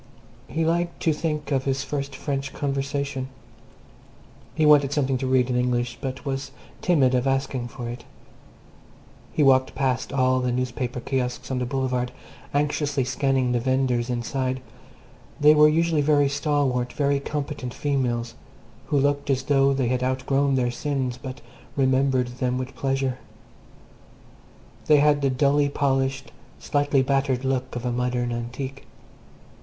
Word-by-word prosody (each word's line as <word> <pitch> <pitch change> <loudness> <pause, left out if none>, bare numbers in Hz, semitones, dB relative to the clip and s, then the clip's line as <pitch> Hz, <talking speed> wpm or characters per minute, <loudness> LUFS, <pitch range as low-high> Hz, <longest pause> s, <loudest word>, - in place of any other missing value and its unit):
He 160 0 -1
liked 170 +1 0
to 160 - +3
think 150 -1 -3
of 135 -1 +1
his 135 0 0
first 140 -1 -4
French 135 -1 -3
conversation. 140 -1 -2 1.3
He 155 - +2
wanted 145 -2 +6
something 135 -3 0
to 130 - -2
read 130 -1 +3
in 125 - -1
English, 125 -1 0
but 130 +1 -5
was 135 0 -3 0.3
timid 145 -8 +3
of 125 +1 +1
asking 135 -2 -1
for 120 0 -7
it. 120 0 -6 1.3
He 150 - +1
walked 130 -1 +4
past 130 -2 -1
all 130 -1 +2
the 125 -1 0
newspaper 125 0 -2
kiosks 125 0 -2
on 130 - 0
the 125 - -2
Boulevard, 125 -2 -1 0.4
anxiously 145 -1 0
scanning 130 0 +1
the 120 - +1
vendors 130 -1 0
inside 130 +2 -2 0.8
they 150 0 +7
were 150 0 +7
usually 165 0 +2
very 145 -1 +3
stalwart, 140 -4 0
very 140 -1 +1
competent 145 -2 -4
females, 120 -5 -1 0.5
who 145 - +1
looked 145 +1 +1
as 135 -1 +1
though 140 -1 +3
they 135 -3 0
had 125 0 0
outgrown 135 +2 +1
their 125 -2 +1
sins 130 -1 -2
but 130 -1 -7 0.3
remembered 130 -2 +2
them 125 0 0
with 130 +1 -5
pleasure. 135 -1 -1 1.7
They 150 - +6
had 145 0 +4
the 140 - +2
dully 140 +2 +2
polished, 135 -1 0 0.3
slightly 145 -2 +1
battered 135 -1 0
look 130 -1 -1
of 120 0 -4
a 125 - 0
modern 125 0 -1
antique. 130 +3 -5
135 Hz, 145 wpm, -24 LUFS, 125-140 Hz, 1.7 s, they